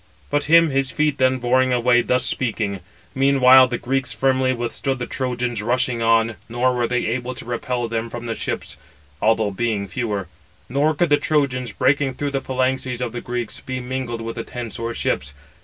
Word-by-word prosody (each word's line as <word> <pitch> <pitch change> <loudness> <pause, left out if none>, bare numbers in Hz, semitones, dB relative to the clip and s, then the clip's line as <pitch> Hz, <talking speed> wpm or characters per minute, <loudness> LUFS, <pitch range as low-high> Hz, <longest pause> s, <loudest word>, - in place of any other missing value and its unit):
But 145 0 +1
him 165 0 +5
his 135 0 +1
feet 150 -1 0
then 130 0 +3
bore 125 +1 +2
away 125 -1 +3
thus 125 +1 +1
speaking. 105 -5 -1 0.3
Meanwhile 130 -1 +6
the 120 0 -2
Greeks 130 +2 -1
firmly 130 -1 +2
withstood 130 +2 -2
the 120 - -3
Trojans 125 -3 -2
rushing 120 +1 0
on, 115 -2 +2
nor 125 +2 +1
were 120 -1 0
they 125 +1 -1
able 125 +2 -2
to - - -8
repel 120 0 -2
them 115 0 -3
from 120 +1 -7
the 115 - -2
ships, - - -4 0.4
although 110 -1 +2
being 105 -1 -1
fewer; 100 -1 -3 0.4
nor 145 +4 +1
could 170 +2 +1
the 145 - +5
Trojans, 130 -7 0
breaking 145 -2 +1
through 145 -1 -2
the 135 -1 -1
phalanxes 130 -1 -1
of 125 -2 -2
the 120 0 -5
Greeks, 120 -2 -4
be 130 0 -5
mingled 125 -2 -4
with 115 +1 -6
the 115 - -3
tents 120 -3 -7
or 115 0 -2
ships. 70 +2 -2
125 Hz, 190 wpm, -21 LUFS, 115-130 Hz, 0.4 s, Meanwhile